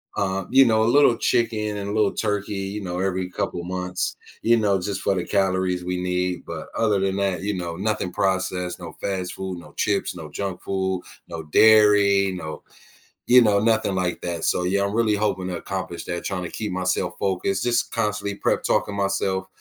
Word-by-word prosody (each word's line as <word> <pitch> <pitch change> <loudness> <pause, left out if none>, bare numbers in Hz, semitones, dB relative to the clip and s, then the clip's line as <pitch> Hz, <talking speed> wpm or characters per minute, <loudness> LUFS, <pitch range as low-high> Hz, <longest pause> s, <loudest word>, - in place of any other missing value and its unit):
uh, 95 -1 -1
you 135 +1 +8
know, 110 -1 +3
a - - +3
little 135 -5 +5
chicken 110 -4 0
and 100 0 -4
a - - -3
little 105 -2 +2
turkey, 105 -1 -2
you 95 +1 -4
know, 90 -1 -4
every 95 -1 -1
couple 85 0 -3
months, 90 0 -3 0.3
you 115 - +5
know, 100 -3 +2
just 95 +1 -3
for 100 - +1
the 90 - -2
calories 95 -2 0
we 90 +1 -2
need, 90 0 -1
but - - -6
other 105 -3 +2
than 95 0 0
that, 100 -2 0
you 100 +1 -2
know, 85 -2 -4
nothing 100 0 -2
processed, 95 -2 -1
no - - -8
fast 95 -2 -2
food, 95 -1 -5
no - - -14
chips, 100 -3 0
no 80 -3 -8
junk 95 +2 -4
food, 95 -1 -1 0.3
no 85 -1 -6
dairy, 100 +2 +5
no 80 -4 -6 0.7
you 125 +1 +8
know, 105 -3 +4
nothing 110 -2 +2
like 90 -1 -1
that. 85 -2 -3
So, 90 - +1
yeah, 100 +2 +1
I'm 100 - -3
really 110 -2 +2
hoping 100 -3 -1
to 90 -1 -3
accomplish 95 -2 -5
that, 85 -1 -4
trying 90 -2 -3
to 85 - -5
keep 105 -3 -4
myself 90 -1 -1
focused, 95 0 0
just 120 0 +1
constantly 105 -2 -1
prep-talking 100 0 0
myself, 95 -1 -1
95 Hz, 195 wpm, -23 LUFS, 90-105 Hz, 0.7 s, you